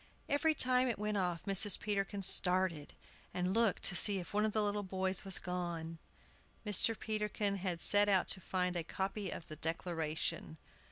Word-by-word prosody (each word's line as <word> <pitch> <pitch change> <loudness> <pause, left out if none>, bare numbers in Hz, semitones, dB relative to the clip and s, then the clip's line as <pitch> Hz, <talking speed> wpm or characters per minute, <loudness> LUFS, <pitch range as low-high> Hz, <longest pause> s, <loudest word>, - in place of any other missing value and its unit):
Every 310 +2 0
time 255 -1 +2
it 240 - -3
went 210 0 -4
off 180 -3 -4
Mrs. 195 0 +6
Peterkin 200 -1 -4
started, 180 -5 0 0.4
and 180 +1 -2
looked 225 -2 0
to 185 - +5
see 200 +2 +9
if 180 0 -9
one 210 +1 0
of 215 - -2
the 215 0 -2
little 205 0 -2
boys 190 -1 -2
was 195 -2 +5
gone. 170 -2 -6 0.7
Mr. 210 +2 +2
Peterkin 210 -2 -4
had 180 -3 -5
set 205 +4 +3
out 190 -3 +1
to 190 - -1
find 180 0 -4
a 170 - -4
copy 195 +3 -5
of 165 - -9
the 155 - -10
"Declaration." 160 -1 -4
190 Hz, 175 wpm, -33 LUFS, 180-210 Hz, 0.7 s, see